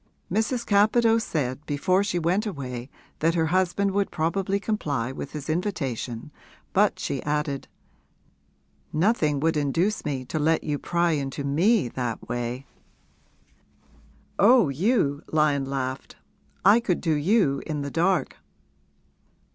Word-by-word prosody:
Mrs. 230 +3 0
Capadose 225 +2 +4
said 140 -5 -2
before 185 +7 +1
she 200 -3 -1
went 180 +6 +1
away 130 - -5 0.3
that 165 +2 +2
her 165 -1 +2
husband 185 +3 +1
would 200 0 0
probably 190 +5 -1
comply 145 - -2
with 135 - -7
his 150 -2 -6
invitation, 150 - -3 0.4
but - - +3
she - - -3
added, 150 -2 -2 1.2
'Nothing 155 -5 +2
would 160 +1 +2
induce 165 +8 0
me 130 -3 -3
to 155 - -3
let 160 +2 +2
you 145 -2 -2
pry 170 0 +1
into 140 -2 -2
me 170 - +2
that 120 -1 -4
way!' 120 +2 -3 1.7
'Oh, 230 - +6
you,' 145 - +1
Lyon 150 -3 +2
laughed 135 -1 -4 0.5
'I 205 +4 +7
could 205 -7 -1
do 165 -3 0
you 150 -3 +2
in 150 -2 -3
the 140 - -5
dark!' 175 -3 +1
155 Hz, 130 wpm, -25 LUFS, 140-195 Hz, 1.7 s, I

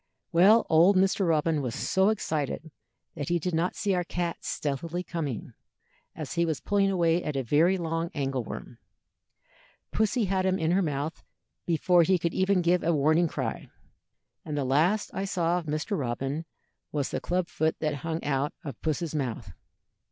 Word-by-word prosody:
Well, 195 +7 +6
old 170 +5 +5
Mr. 190 0 +2
Robin 160 -1 +2
was 125 -4 -3
so 190 +2 +2
excited 160 -6 -2 0.4
that 145 -4 -5
he 175 - +2
did 175 +2 -3
not 165 +3 0
see 200 -2 0
our 180 -1 +1
cat 175 -1 -3
stealthily 165 +5 -3
coming, 150 -10 -4 0.6
as - - -5
he 170 - +1
was 160 -4 -1
pulling 200 -1 +1
away 170 -2 +2
at 150 -2 -3
a 135 - 0
very 160 +10 +3
long 165 -1 -2
angle 135 -3 -1
worm. - - -8 1.1
Pussy 220 +1 +1
had 190 0 0
him 190 0 +2
in 160 -1 0
her 190 +2 +3
mouth 150 -1 -3 0.4
before 175 +1 +4
he 185 +3 +3
could 170 0 -2
even 190 -1 +2
give 175 +1 +3
a 170 -1 +2
warning 155 +4 +3
cry, - - -4 0.7
and 150 -2 -4
the 140 - 0
last 160 +11 +2
I 195 - -2
saw 175 -2 +1
of 165 - -10
Mr. 155 +7 -2
Robin 135 +2 -2 0.5
was 145 -3 -1
the - - -3
club 180 0 -1
foot 160 0 0
that 155 -2 -1
hung 165 +3 -4
out 140 0 0
of 140 -6 -7
Puss's 160 +1 -2
mouth. 120 -9 -3
165 Hz, 175 wpm, -28 LUFS, 150-180 Hz, 1.1 s, Well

